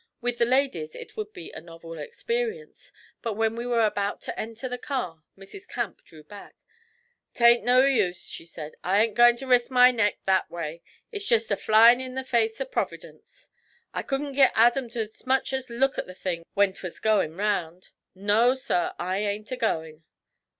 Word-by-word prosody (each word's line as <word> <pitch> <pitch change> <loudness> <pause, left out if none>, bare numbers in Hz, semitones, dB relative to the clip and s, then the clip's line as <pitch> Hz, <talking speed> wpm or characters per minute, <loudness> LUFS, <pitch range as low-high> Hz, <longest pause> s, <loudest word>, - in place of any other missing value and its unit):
With 245 0 -3
the 235 - +4
ladies 245 - 0
it - - -10
would 430 -1 -5
be 370 -5 -10
a - - -9
novel 165 -1 -11
experience, 465 - -4 0.3
but 225 -3 -3
when 225 +1 0
we 235 +1 -4
were 235 -2 +3
about 205 -1 -1
to - - -6
enter 230 +3 -5
the 250 0 -5
car 185 - -4 0.2
Mrs. 195 - -12
Camp 235 -7 -4
drew 155 -2 -16
back. 200 +6 -13 0.8
'Tain't 235 0 +5
no 255 +2 +5
use,' 205 -10 +1
she 165 - -8
said. 155 -2 -8
'I 190 +3 +2
ain't 225 -2 -1
goin' 240 0 +6
to 270 - -8
risk 245 -2 +3
my 250 -1 +6
neck 225 -4 +1
that 190 -1 +2
way. 165 -1 -6 0.3
It's 410 -2 -4
jest 225 -1 +2
a - - +3
flyin' 230 +5 +6
in 255 0 -7
the 265 - -3
face 230 -3 0
of - - -5
Providence! - - -6 0.4
I - - -2
couldn't 280 0 -3
git 270 -1 +5
Adam 240 +2 +3
to 230 -1 -2
'smuch 260 +5 -1
as 265 -1 -3
look 265 +3 0
at - - -4
the 185 - -10
thing 170 -3 -4
when 200 -1 +3
'twas 185 -2 -8
goin' 205 -7 +1
round. 185 -4 -2 0.2
No, 210 +6 +3
sir, 260 -10 -1
I 185 +2 -2
ain't 210 +2 -3
a - - -1
going'!' 160 -9 -2
230 Hz, 190 wpm, -26 LUFS, 190-255 Hz, 0.8 s, goin